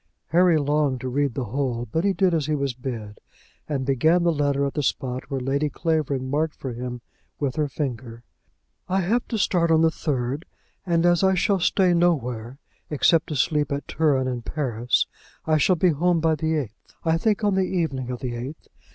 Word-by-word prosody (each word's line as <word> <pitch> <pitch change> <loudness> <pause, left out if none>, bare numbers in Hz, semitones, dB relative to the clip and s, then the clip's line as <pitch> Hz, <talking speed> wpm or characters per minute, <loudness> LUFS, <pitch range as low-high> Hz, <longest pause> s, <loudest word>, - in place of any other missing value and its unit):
Harry 175 +2 +4
longed 145 -2 +1
to 130 - -5
read 140 0 0
the 130 - -1
whole, 120 0 -2
but 160 - 0
he 200 - +3
did 190 -2 +2
as 155 -3 0
he 155 - +1
was 140 -2 -1
bid, 120 -5 -6 0.5
and 135 -3 -1
began 160 +6 +3
the 170 - +3
letter 140 -2 +1
at 140 - -2
the 150 - -1
spot 130 -2 -2
which 135 -2 -3
Lady 140 +3 0
Clavering 145 -4 -1
marked 150 +3 -1
for 130 -3 -6
him 125 0 -5 0.4
with 140 -3 -1
her 155 -2 0
finger. 120 -5 -5 0.7
"I 190 +1 +2
have 230 +7 0
to 225 - -2
start 175 -4 +2
on 160 -1 +4
the 160 - +4
third, 140 0 -2 0.4
and 170 -1 +2
as 175 +1 +4
I 190 0 +4
shall 195 +2 +2
stay 180 +1 +3
nowhere 130 -9 0 0.3
except 155 +2 +3
to 155 - -4
sleep 150 +1 +1
at 140 0 -3
Turin 140 -5 +1
and 125 -2 -3
Paris, 125 -5 0 0.4
I 155 -1 +2
shall 185 +5 +4
be 180 +2 +3
home 170 +2 +2
by 160 0 +2
the 160 +1 0
eighth; 125 -8 -6
I 165 0 +2
think 215 +2 +1
on 205 -1 +3
the 190 - +2
evening 160 -9 -1
of 125 -1 -5
the 125 -2 -3
eighth. 125 +6 -7
145 Hz, 205 wpm, -24 LUFS, 130-165 Hz, 0.7 s, Harry